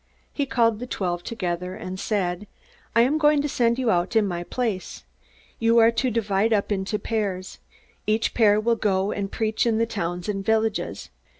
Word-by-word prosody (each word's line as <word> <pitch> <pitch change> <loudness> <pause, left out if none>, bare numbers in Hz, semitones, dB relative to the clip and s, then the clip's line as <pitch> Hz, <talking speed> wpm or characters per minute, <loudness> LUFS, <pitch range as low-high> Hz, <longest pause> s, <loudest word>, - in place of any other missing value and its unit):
He 285 -2 -1
called 230 -4 +2
the 250 - -6
twelve 175 -6 -2
together, 180 -4 -3
and 185 -3 -6
said: 195 -2 -2 0.5
"I 230 - +6
am 275 +6 +2
going 300 -1 +4
to - - 0
send 235 -4 +1
you 250 -4 +1
out 175 +5 0
in 220 -2 +4
my 175 -2 -3
place. 215 -2 -3 0.6
You 230 +1 +3
are 230 0 +6
to 255 +2 0
divide 215 -1 +1
up 210 -1 +1
into 200 +2 -1
pairs. 200 -4 -3 0.5
Each 215 +1 +1
pair 210 -3 +4
will 230 +1 +1
go 195 -2 +1
and 195 -1 -3
preach 220 +1 0
in 225 -1 +2
the 230 - +2
towns 175 -6 -4
and 195 -2 -2
villages. 220 +1 -1
215 Hz, 185 wpm, -24 LUFS, 190-230 Hz, 0.6 s, I